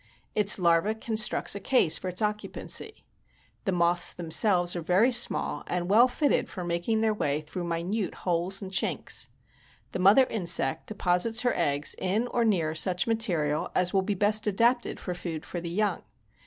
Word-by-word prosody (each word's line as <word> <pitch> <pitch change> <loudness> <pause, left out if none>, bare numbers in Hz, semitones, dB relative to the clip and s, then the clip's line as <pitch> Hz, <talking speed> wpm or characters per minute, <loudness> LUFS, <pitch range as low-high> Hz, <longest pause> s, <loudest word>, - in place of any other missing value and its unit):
Its 210 -1 +2
larva 175 +4 +2
constructs 220 -1 -1
a 200 - 0
case 200 - +4
for 185 - -4
its 180 +4 -3
occupancy. 210 0 -4 0.6
The 195 - 0
moths 175 0 +1
themselves 175 +1 +2
are 175 - -3
very 185 +10 +3
small 240 -1 +2
and 180 +1 -2
well 235 +4 +6
fitted 285 +3 0
for 185 - -6
making 175 +6 -1
their 220 -1 +2
way 150 -7 -1
through 175 +4 -6
minute 175 +5 -3
holes 180 +3 -1
and 190 - -7
chinks. 190 - -3 0.6
The - - -4
mother 200 +8 +6
insect 170 - -1
deposits 210 +3 +1
her 245 - +1
eggs 145 +1 0
in 200 +6 0
or 240 - 0
near 175 -8 +1
such 180 +3 -1
material 175 -10 -1
as 180 -1 +1
will 195 - +3
be 200 +2 -2
best 210 +3 +1
adapted 235 +4 +1
for 180 - -5
food 170 -2 -6
for 175 - -6
the 170 - -5
young. 200 +1 -1
185 Hz, 170 wpm, -27 LUFS, 175-215 Hz, 0.6 s, well